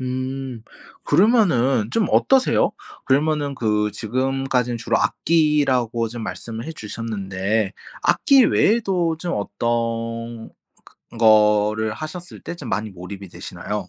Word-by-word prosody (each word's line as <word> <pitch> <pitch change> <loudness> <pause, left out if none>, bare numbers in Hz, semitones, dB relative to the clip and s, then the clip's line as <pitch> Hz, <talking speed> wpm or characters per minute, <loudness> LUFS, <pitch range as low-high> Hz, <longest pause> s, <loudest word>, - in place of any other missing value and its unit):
음 130 -1 -4 0.4
그러면은 150 - +3
좀 225 -2 +2
어떠세요? 265 -1 +3 0.3
그러면은 145 +1 +1
그 105 -3 0
지금까지는 130 +1 -1
주로 115 - 0
악기라고 135 -8 +1
좀 115 0 -7
말씀을 115 +1 -6
해 165 - -5
주셨는데 105 -4 -3 0.3
악기 275 -4 +5
외에도 190 -8 +2
좀 175 +1 -3
어떤 115 +1 -3 0.6
그 - - -13
거를 105 -1 +4
하셨을 155 +8 -8
때 170 - -6
좀 135 -8 -8
많이 105 +3 -2
몰입이 95 +1 -9
되시나요? 105 +2 -6
120 Hz, 260 characters per minute, -21 LUFS, 110-150 Hz, 0.6 s, 악기